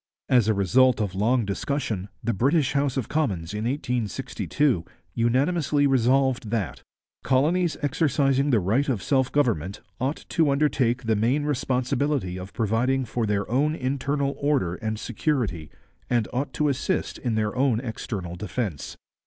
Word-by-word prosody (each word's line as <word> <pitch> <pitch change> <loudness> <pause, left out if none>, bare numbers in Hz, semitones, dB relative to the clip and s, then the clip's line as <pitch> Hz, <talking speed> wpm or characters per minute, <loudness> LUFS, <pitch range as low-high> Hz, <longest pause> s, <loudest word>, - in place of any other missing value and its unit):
As 120 -5 +4
a 110 - +3
result 125 +7 +4
of 100 -4 -1
long 115 +4 +1
discussion, 105 -2 -2
the 115 +1 0
British 135 - +2
House 140 -1 0
of 125 - -1
Commons 100 - -1
in 105 +1 -3
1862 125 - -1 0.3
unanimously 145 +5 +2
resolved 130 -2 +2
that 105 - -2 0.4
'colonies 155 +6 +2
exercising 140 -2 +2
the 120 -5 +4
right 110 +10 +1
of 115 -8 -1
self 130 -2 +1
government 105 - 0 0.2
ought 135 +5 -2
to 160 -3 +2
undertake 135 -4 +1
the 110 -1 +1
main 120 +8 +1
responsibility 130 -6 -1
of 90 +2 -8
providing 125 +4 0
for 115 0 -2
their 100 -1 0
own 145 +6 +1
internal 140 +1 -1
order 140 - +1
and 110 +2 -3
security 110 - -2 0.4
and 120 -4 +1
ought 135 +2 -2
to 150 +4 +1
assist 140 -3 -1
in 120 -3 -1
their 110 -1 -1
own 130 -3 +2
external 105 -7 -5
defence.' 95 - -4
125 Hz, 145 wpm, -25 LUFS, 105-140 Hz, 0.4 s, As